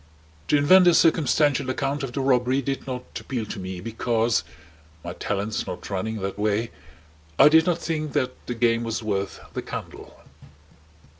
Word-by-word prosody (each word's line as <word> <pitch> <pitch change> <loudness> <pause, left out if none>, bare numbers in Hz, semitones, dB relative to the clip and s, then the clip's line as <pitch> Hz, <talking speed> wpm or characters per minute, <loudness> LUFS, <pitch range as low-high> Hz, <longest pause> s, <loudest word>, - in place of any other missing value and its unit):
To 150 - +4
invent 180 +6 +6
a 175 - +6
circumstantial 145 -4 +3
account 140 +2 -2
of 135 -3 -4
the 135 - -2
robbery 130 0 +2
did 135 +1 -3
not 125 -1 -4 0.2
appeal 120 -5 -4
to 105 - -7
me, 95 -1 -6
because 115 +1 0 0.6
my 85 0 -5
talents 105 +3 -3
not 90 +2 -7
running 110 +3 -2
that 95 +1 -4
way 105 +2 0 0.7
I - - +8
did 160 +2 +5
not 175 -2 +2
think 155 -4 -3
that 130 0 0 0.2
the 120 - -3
game 115 0 +2
was 115 0 -3
worth 100 -2 -2
the - - -3
candle. - - -8
120 Hz, 165 wpm, -24 LUFS, 105-140 Hz, 0.7 s, I